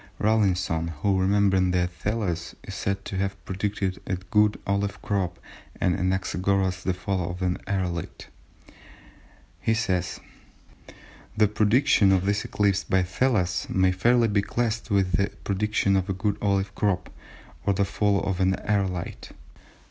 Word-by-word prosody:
Rawlinson, 95 -6 +1 0.2
who, 100 -2 +3
remembering 95 -1 +3
that 90 0 0
Thales 90 -2 -3
is - - -8
said 95 0 -2
to 95 - -4
have 95 0 -3
predicted 95 -1 -2
a 95 - 0
good 105 +3 +1
olive 100 0 -1
crop, 95 -4 -1 0.4
and 90 -2 +2
Anaxagoras 95 +1 0
the 95 0 -1
fall 90 -1 -2
of 90 +1 -5
an 90 -1 0
aërolite, 90 -4 -3 1.5
says:—"The 105 +1 -4
prediction 105 0 +3
of 95 -1 +2
this 100 +1 +1
eclipse 100 -2 +1
by 95 -1 +2
Thales 95 -2 0
may 95 0 +3
fairly 115 +6 +3
be 100 -2 +2
classed 115 +2 -2
with 100 -3 +2
the 100 +1 +2 0.2
prediction 100 0 +1
of 95 -1 0
a - - +1
good 100 +2 -1
olive 100 -1 0
crop, 95 -4 -1 0.6
or 100 - +3
the 100 - +2
fall 100 0 +1
of 95 -2 -2
an 95 0 +3
aërolite. 95 -3 -2
95 Hz, 140 wpm, -25 LUFS, 95-105 Hz, 1.5 s, who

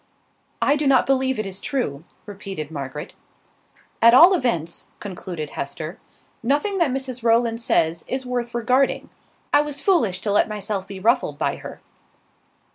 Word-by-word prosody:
"I 285 +1 +3
do 290 -1 0
not 270 -2 +5
believe 265 -1 +1
it 215 - -2
is 195 0 -5
true," 180 - -3 0.2
repeated 195 -7 -7
Margaret. 140 -1 -6 0.9
"At 230 +1 +8
all 345 +8 +9
events," 175 - -1
concluded 175 -6 -6
Hester, 155 +6 -6 0.4
"nothing 295 - 0
that 335 -5 +3
Mrs 260 -1 -3
Rowland 230 0 +2
says 165 -7 +1
is 260 0 -3
worth 245 -1 -3
regarding. 255 +3 +1 0.4
I - - +6
was 295 -1 -3
foolish 255 - +2
to 205 - -1
let 205 - +3
myself 205 -2 -4
be 195 -1 -8
ruffled 225 - +1
by - - -1
her." - - -10
230 Hz, 150 wpm, -22 LUFS, 185-265 Hz, 0.9 s, all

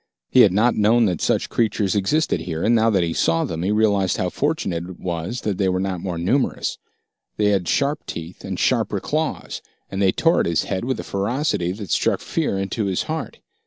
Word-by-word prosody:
He - - +5
had 105 -6 +7
not 110 +6 +3
known 110 +3 +4
that 90 -5 -1
such - - +1
creatures 105 -4 +1
existed 145 +11 +1
here, 80 -2 -4
and 115 - +3
now 115 -1 +4
that 95 -5 +2
he 85 -1 -1
saw 80 0 +2
them, 80 -1 -4
he 95 - 0
realized 105 -3 +2
how 90 - 0
fortunate 140 - -1
it 90 - -10
was 90 +7 -4
that 105 -3 -2
they 95 -2 +2
were 90 0 0
not 95 -2 -2
more 90 -2 -3
numerous. 120 +11 0 0.6
They 105 -1 +3
had 95 -4 +1
sharp 140 +2 0
teeth 85 +2 -7
and - - -4
sharper - - +1
claws, - - -3 0.3
and 95 - -2
they 95 -1 +4
tore 165 - +2
at - - +1
his 85 -2 +1
head 95 +3 -3
with 130 +1 -2
a - - -4
ferocity 100 - -1
that 100 -3 -7
struck - - +2
fear 95 - -1
into 95 +3 -2
his 95 -2 0
heart. 160 -2 -5
100 Hz, 215 wpm, -22 LUFS, 90-115 Hz, 0.6 s, had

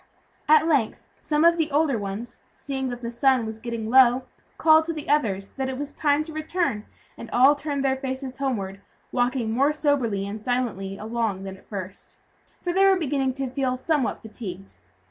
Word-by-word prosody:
At 310 0 +6
length, 280 -9 +1 0.2
some 300 +1 +1
of 340 0 +5
the 320 -1 +1
older 295 -2 +2
ones, 205 +2 -5
seeing 265 -1 -4
that 245 0 -7
the 235 - -3
sun 255 0 +2
was 220 0 -6
getting 230 -1 -4
low, 255 0 +6 0.3
called 315 0 +5
to 330 - -2
the 305 -2 -7
others 200 -10 0
that 265 -1 -1
it 260 - -4
was 285 +1 -4
time 290 0 +2
to 315 0 -10
return, 310 - -2 0.3
and 230 - -8
all 260 +5 +6
turned 285 -1 -3
their 265 -1 +2
faces 265 -1 -5
homeward, 200 -8 -2 0.3
walking 245 -2 0
more 275 +6 +3
soberly 275 -10 0
and 205 +2 -6
silently 215 -5 -2
along 220 -3 -2
than 190 -1 -6
at 190 - -21
first, 195 -1 -7 0.5
for 350 - -1
they 385 +2 +4
were 390 -1 +5
beginning 270 -5 -1
to 270 -1 -2
feel 255 -1 -1
somewhat 285 -1 -1
fatigued. 195 -4 -8
260 Hz, 185 wpm, -25 LUFS, 220-290 Hz, 0.5 s, At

